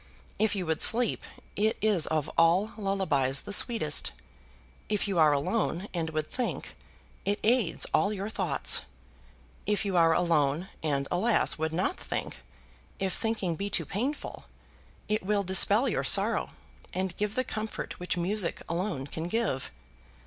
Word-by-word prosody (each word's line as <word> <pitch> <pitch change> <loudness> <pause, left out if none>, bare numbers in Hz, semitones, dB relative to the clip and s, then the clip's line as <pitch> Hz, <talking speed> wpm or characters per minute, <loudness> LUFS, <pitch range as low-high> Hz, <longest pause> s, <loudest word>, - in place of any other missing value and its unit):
If 220 0 +2
you 190 -2 -2
would 160 -1 -1
sleep, 235 -1 +5 0.3
it 215 +2 +1
is 205 -7 +2
of 155 -2 -1
all 175 +6 +3
lullabies 185 - 0
the 205 - -5
sweetest. 155 - +2 0.8
If 210 0 0
you 190 -4 0
are 155 -2 +6
alone 175 +6 -1
and 165 -2 -2
would 155 -1 -2
think, 250 -2 -4 0.5
it 205 +1 0
aids 220 -7 +2
all 200 - +3
your 200 -1 -4
thoughts. 185 -9 +3 0.8
If 210 0 0
you 195 -2 -1
are 165 -1 +5
alone, 160 0 +1
and, 140 -3 -1
alas! 210 -1 +1
would 160 0 -1
not 175 +3 -1
think, - - -4 0.6
if 190 -1 -2
thinking 220 -7 -2
be 200 +5 -3
too 170 -5 +2
painful, 255 - -4 0.6
it 215 +1 0
will 200 +1 0
dispel 200 +6 +4
your - - -1
sorrow, - - +1 0.5
and 185 -1 -2
give 210 +1 -2
the 255 - +1
comfort 220 -2 -5
which 180 0 -2
music 185 +1 -1
alone 170 -5 -2
can 160 +4 -5
give. 210 - -1
190 Hz, 150 wpm, -28 LUFS, 160-210 Hz, 0.8 s, are